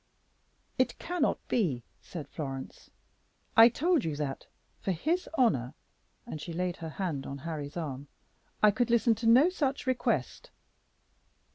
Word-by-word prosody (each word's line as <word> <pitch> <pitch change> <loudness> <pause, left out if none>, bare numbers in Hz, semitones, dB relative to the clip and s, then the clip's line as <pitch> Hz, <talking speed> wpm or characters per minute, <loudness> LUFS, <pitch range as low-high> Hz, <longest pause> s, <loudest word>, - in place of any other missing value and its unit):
"It 255 - +2
cannot 355 0 0
be," 155 - 0 0.2
said 155 -6 -7
Florence; 135 -3 -7 0.7
"I 225 +1 +9
told 330 +2 +1
you 155 -2 -2
that, 145 -2 -4 0.3
for - - -4
his 325 - -1
honor," 145 - +2 0.5
and 155 - -6
she 170 - -6
laid 180 +1 -2
her 165 - -6
hand 155 -4 -3
on 140 - -5
Harry's 150 0 -5
arm, 145 -4 -4 0.6
"I 210 - +8
could 240 +3 0
listen 235 0 +4
to 225 +1 -3
no 255 +9 +7
such 280 -6 -1
request." 245 - -1
180 Hz, 140 wpm, -30 LUFS, 145-245 Hz, 0.7 s, I